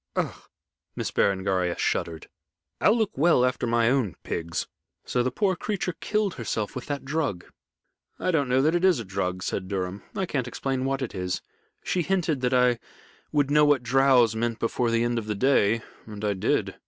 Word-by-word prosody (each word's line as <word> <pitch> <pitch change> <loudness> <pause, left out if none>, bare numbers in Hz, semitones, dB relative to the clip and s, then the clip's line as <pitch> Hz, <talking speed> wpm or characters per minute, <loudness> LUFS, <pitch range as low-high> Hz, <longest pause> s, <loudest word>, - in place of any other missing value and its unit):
"Ugh!" - - 0 0.6
Miss - - -3
Berengaria 95 -2 +1
shuddered. 80 -2 -2 0.5
"I'll 215 - +4
look 220 -3 0
well 145 -4 +4
after 125 -1 -1
my 115 0 +3
own 125 - 0
pigs. 85 0 -3 0.4
So 125 - 0
the 125 - +1
poor 190 - +1
creature 190 -2 -2
killed 210 -3 0
herself 110 -3 -3
with 130 - -6
that 140 -2 -4
drug?" 135 - -2 0.7
"I 185 - 0
don't 145 -6 +1
know 130 +2 +3
that 155 +3 +3
it 175 +1 +1
is 185 -7 +4
a 115 - -5
drug," 95 -1 -2
said 95 - -3
Durham. 95 0 -3
"I 190 - 0
can't 135 -8 -2
explain 130 +1 -2
what 135 0 -1
it 125 - -5
is. 90 -2 -3 0.4
She 180 - 0
hinted 170 -6 0
that 125 -1 +1
I 125 -1 +3 0.5
would 145 -2 +1
know 150 0 +5
what 145 -4 +4
drows 125 -2 +4
meant 115 0 -1
before 115 +1 0
the 115 0 +2
end 120 0 0
of 110 - -8
the 105 - -1
day, 115 -2 +3 0.2
and 105 -1 -6
I 105 - +1
did. 95 - -1
125 Hz, 190 wpm, -26 LUFS, 105-145 Hz, 0.7 s, know